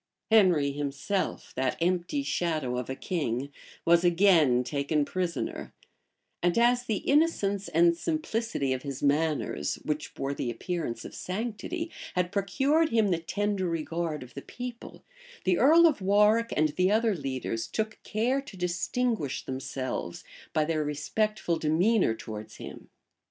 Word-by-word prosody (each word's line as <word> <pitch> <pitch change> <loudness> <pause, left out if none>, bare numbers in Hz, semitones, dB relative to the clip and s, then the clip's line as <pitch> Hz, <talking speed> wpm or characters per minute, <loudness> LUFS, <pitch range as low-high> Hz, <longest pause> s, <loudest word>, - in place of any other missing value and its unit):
Henry 180 -10 +5
himself, 145 +7 -3
that 130 0 0
empty 180 - 0
shadow 155 - -1
of 125 0 -4
a 130 - -2
king, 140 -6 -2 0.3
was 170 +1 +5
again 170 -8 +4
taken 145 +3 0
prisoner; 180 +1 -3 0.7
and 175 +2 +2
as 245 +1 +3
the 220 -4 0
innocence 210 - +2
and 170 +1 +4
simplicity 230 - -1
of 130 - -3
his 140 -1 -6
manners, 150 +2 +1
which 150 0 -3
bore 140 +1 -2
the 125 - -3
appearance 120 -3 -4
of - - -8
sanctity, 235 - -4 0.2
had 180 -1 0
procured 270 - +2
him 220 -3 +3
the 175 -3 +1
tender 200 +1 -1
regard 165 -2 -2
of 125 - -14
the 140 - -7
people,[*] 245 - -8 0.4
the 185 -2 +2
earl 320 +7 +7
of 300 -10 +3
Warwick 210 +4 +4
and 155 0 +3
the 185 +5 +1
other 220 +1 +3
leaders 130 -7 -3
took 215 - -3
care 245 +6 0
to 215 -8 -12
distinguish 180 - -1
themselves 130 0 -4 0.3
by 155 - +1
their 155 -1 0
respectful 170 +4 -1
demeanor 165 - +2
towards 110 -1 -8
him. - - -10
175 Hz, 140 wpm, -28 LUFS, 145-215 Hz, 0.7 s, earl